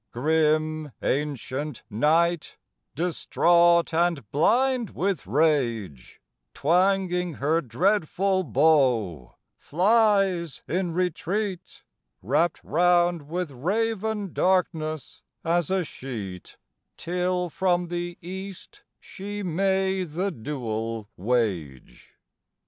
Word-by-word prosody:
Grim 155 +1 +1
ancient 145 -1 -2
Night, 160 +9 +1 0.4
distraught 170 0 +3
and 165 -8 +1
blind 245 - +2
with 190 - -1
rage, 115 - 0 0.4
Twanging 180 +1 +1
her 155 +5 +1
dreadful 185 - +1
bow, 125 - +2 0.2
flies 195 -3 +2
in 180 -1 -1
retreat, 185 +2 -3 0.4
Wrapt 150 - +1
round 175 -1 +2
with 175 -2 -3
raven 210 - -2
darkness 160 -5 0 0.2
as 170 -1 +1
a 190 -1 +1
sheet, 110 - -8 0.4
Till 180 +1 -1
from 180 0 0
the 175 0 -4
east 190 +1 -8 0.2
she 205 +1 -7
may 190 +2 +1
the 180 +4 -2
duel 115 - -4
wage. 95 - -3
170 Hz, 85 wpm, -25 LUFS, 140-185 Hz, 0.4 s, distraught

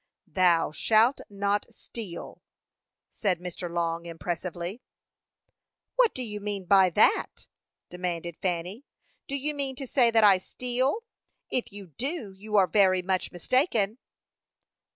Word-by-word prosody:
"'Thou 175 -4 +3
shalt 225 - +3
not 200 0 -1
steal,'" 210 -7 -8 0.7
said 185 -5 0
Mr. 180 0 -6
Long, 170 0 -2
impressively. 175 +4 -5 1.1
"What - - +3
do 255 - -3
you 210 -3 -5
mean 200 -2 -4
by 190 0 +6
that?" 170 - +2 0.5
demanded 175 -1 -4
Fanny. 180 +6 -2 0.4
"Do 280 - -2
you 290 +2 -1
mean 275 -2 -3
to 270 - -5
say 245 -2 +3
that 225 -1 +4
I 195 -3 +7
steal? 255 - -1 0.5
If 240 -2 -1
you 200 0 -9
do, 235 - -5
you 210 +2 -5
are 195 -2 +6
very 185 -2 +3
much 185 0 -1
mistaken." 225 - +1
200 Hz, 130 wpm, -27 LUFS, 180-240 Hz, 1.1 s, I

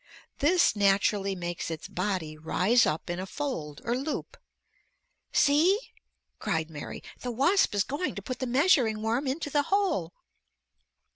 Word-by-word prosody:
This 340 -2 +4
naturally 200 0 +2
makes 175 -2 -4
its 160 -2 -5
body 180 -5 -2
rise 185 +9 +2
up 155 +1 -2
in 175 +1 -3
a 190 - -4
fold 180 - -4
or 235 +1 0
loop. 275 +4 -4 1.0
"See," 310 +8 +4 0.6
cried 160 0 -2
Mary, 145 -2 -7 0.2
"the 250 - -4
wasp 275 - +2
is 200 - +3
going 290 - -3
to 200 - -5
put 255 +3 -5
the 260 - -2
measuring 245 -5 +3
worm 235 +5 0
into 290 +2 -2
the 290 - +3
hole." 375 - 0
220 Hz, 145 wpm, -28 LUFS, 180-285 Hz, 1.0 s, This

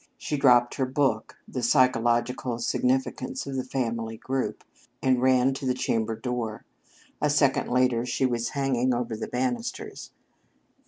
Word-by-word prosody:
She 150 - -3
dropped 125 -3 +4
her 130 - +1
book, 130 -4 0
"The 125 - -4
Psychological 120 0 +2
Significance 130 +1 -1
of 140 -1 -5
the 130 - -1
Family 115 -3 -3
Group," 130 +3 -3 0.4
and 130 -2 +2
ran 130 0 +4
to 135 - -6
the 125 - +1
chamber 115 -3 -1
door. 115 -2 -4 0.6
A 150 - +2
second 140 -2 +2
later 125 -2 +2
she 125 +2 0
was 120 -2 0
hanging 130 -2 +1
over 120 -2 -2
the 110 - -5
banisters. 125 -2 -3
125 Hz, 145 wpm, -26 LUFS, 120-130 Hz, 0.6 s, dropped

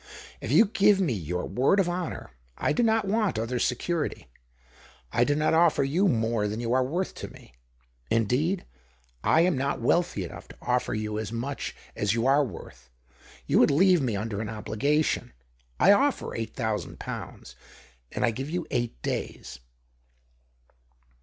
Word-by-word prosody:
If - - -4
you 225 - +7
give 200 -1 +3
me 170 -10 +1
your 90 -2 -3
word 130 - +2
of 190 - +2
honour, 175 - -4 0.3
I 150 - +1
do - - +1
not 225 -2 +2
want 210 - 0
other 115 +3 -2
security. 155 +6 -1 0.9
I 120 - +3
do 145 +4 +1
not 155 +2 +2
ofler 160 -4 +4
you 180 +8 +2
more 115 - +1
than 105 +2 -3
you 120 0 -1
are 130 0 +3
worth 175 +9 -2
to - - -7
me - - -16 0.3
— - - -36 0.2
indeed, 135 - +1 0.6
I 160 - +4
am 175 -1 +3
not 140 +1 -1
wealthy 120 - +1
enough 85 - -9
to - - -14
offer 125 -2 0
you 105 0 -3
as 110 -1 -4
much 125 +5 -4 0.2
as 105 +1 0
you 115 +1 0
are 140 +2 +4
worth. 115 - -9 0.6
You - - +3
would - - +6
leave 180 +3 +4
me 120 -6 0
under 105 0 -3
an 110 - -4
obligation. 110 - 0 0.5
I 195 - +7
offer 275 +7 +2
eight 115 -1 -5
thousand 110 -7 -3
pounds, - - -7 0.6
and - - 0
I 115 - +2
give 135 +5 -5
you 175 +1 -2
eight 120 - -2
days." 65 - -4
130 Hz, 170 wpm, -27 LUFS, 110-175 Hz, 0.9 s, you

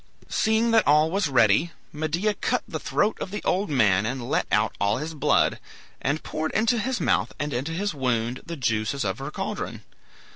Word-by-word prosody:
Seeing 220 +2 +2
that 225 -1 +4
all 150 +2 +4
was 195 -2 +1
ready, 125 +5 +3 0.2
Medea 160 +7 0
cut - - -1
the - - -4
throat 210 +1 0
of - - -3
the 210 +2 -5
old 195 +3 0
man 105 -9 +3
and 120 +2 -3
let - - 0
out - - +2
all 100 +2 +2
his 155 +4 -4
blood, 150 - +2 0.4
and 145 +4 -1
poured 155 0 -3
into 230 +2 +2
his 260 +3 -1
mouth - - +1
and 145 0 -3
into 135 +6 -2
his 195 +3 -2
wound 125 -3 -1
the 170 -1 -7
juices 115 +1 -1
of - - -2
her 135 +2 -4
caldron. - - -5
150 Hz, 190 wpm, -25 LUFS, 125-200 Hz, 0.4 s, that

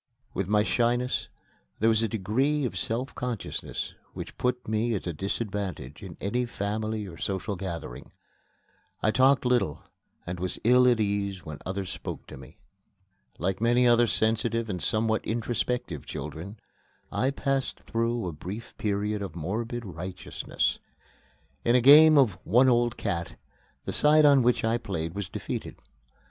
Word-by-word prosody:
With 95 - -2
my 105 +1 +3
shyness 120 +3 0 0.5
there 110 - +2
was 110 -1 +4
a 115 - +1
degree 130 +8 0
of 125 - -3
self 120 +3 -1
consciousness 125 -3 -4 0.2
which - - -7
put 125 0 -1
me 110 +2 0
at 100 - -4
a 85 - -2
disadvantage 95 - -4
in 95 -4 -9
any 120 +5 -1
family 110 0 -3
or 85 -4 -10
social 100 +1 -2
gathering. 90 -3 -6 0.9
I 110 - +4
talked 130 +3 +4
little 105 -11 +1 0.4
and 90 0 -5
was 90 0 -3
ill 125 +2 +6
at 120 -2 +4
ease 100 -3 -1
when 75 -2 -7
others 95 -1 -3
spoke - - -6
to - - -9
me. 65 +5 -13 0.8
Like 95 +5 -2
many 120 +2 +4
other 120 0 +5
sensitive 115 +1 +1
and 90 - -4
somewhat 110 0 +1
introspective 115 - -2
children, 80 +9 -6 0.5
I 130 - +1
passed 135 -1 -1
through 115 -1 -1
a 90 - -2
brief 95 +9 -8
period 105 0 -1
of 95 -5 -5
morbid 115 +8 -3
righteousness. 90 0 -3 0.8
In 120 - +3
a - - +6
game 150 +4 +9
of 110 -10 +4
"one 125 +7 +5
old 120 -1 +2
cat," 85 -5 -3 0.5
the - - -3
side 150 +1 +5
on 140 -2 +7
which 120 0 +2
I 115 +1 +1
played 85 -7 -4
was 100 -3 -4
defeated. - - -5
110 Hz, 155 wpm, -27 LUFS, 95-120 Hz, 0.9 s, game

